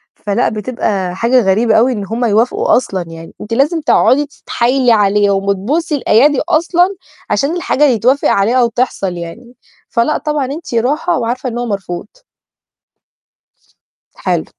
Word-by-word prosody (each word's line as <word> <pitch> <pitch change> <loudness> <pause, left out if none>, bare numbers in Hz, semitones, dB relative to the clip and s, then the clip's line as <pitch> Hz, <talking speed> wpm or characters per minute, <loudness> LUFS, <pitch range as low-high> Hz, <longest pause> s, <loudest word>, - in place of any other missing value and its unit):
فلأ، 200 -1 -1
بتبقى 210 -4 -3
حاجة 240 +5 +2
غريبة 220 +3 +2
أوي 240 +4 +4
إن 205 -4 -4
هُم 230 +4 -2
يوافقوا 225 +2 +2
أصلًا 195 -7 -3
يعني. 165 0 -11
أنتِ 215 - -6
لازم 300 +7 +1
تقعدي 295 -1 +3
تتحايلي 255 -2 0
عليهم 200 -2 +2
وتبوسي 250 - -1
الأيادي 275 +1 +3
أصلًا 350 +3 +2 0.3
عشان 275 +11 0
الحاجة 320 -4 0
يتوافق 260 0 +2
عليها 200 +5 +2
أو 240 - +3
تحصل 230 -5 -2
يعني. 235 +9 -9 0.3
فلأ 235 +6 +1
طبعًا، 300 -3 -2
أنتِ 285 +2 -7
راحة 290 +9 0
وعارفة 245 +2 -2
إنه 240 0 -4
هو - - -2
مرفوض. 195 -5 -5 2.1
حلو. - - -2
240 Hz, 140 wpm, -15 LUFS, 205-280 Hz, 2.1 s, أوي